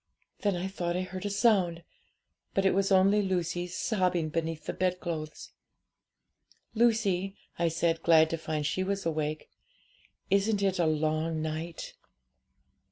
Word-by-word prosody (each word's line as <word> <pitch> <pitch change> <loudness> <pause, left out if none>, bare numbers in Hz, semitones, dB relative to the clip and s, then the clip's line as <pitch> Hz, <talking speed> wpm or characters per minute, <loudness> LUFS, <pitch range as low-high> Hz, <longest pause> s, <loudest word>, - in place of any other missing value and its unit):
Then 200 -3 +1
I 175 +2 -2
thought 175 -2 -2
I 185 - -1
heard 185 +2 -5
a - - -2
sound, 195 -6 +2 0.7
but 195 - +2
it 190 - +4
was 195 +1 +1
only 195 +2 +5
Lucy 175 -2 -1
sobbing 180 -3 0
beneath 165 0 -3
the - - -3
bedclothes. 175 -4 -3 1.2
'"Lucy," 205 -5 +1 0.2
I 170 - +3
said, 165 0 0
glad 160 -1 +5
to 165 - -1
find 155 -2 -3
she 185 +5 0
was 195 0 -2
awake, 155 -1 -2 0.8
"isn't 200 +1 +2
it 190 -1 +1
a 170 - +3
long 155 +1 0
night?" 160 +2 -5
175 Hz, 140 wpm, -29 LUFS, 165-195 Hz, 1.2 s, only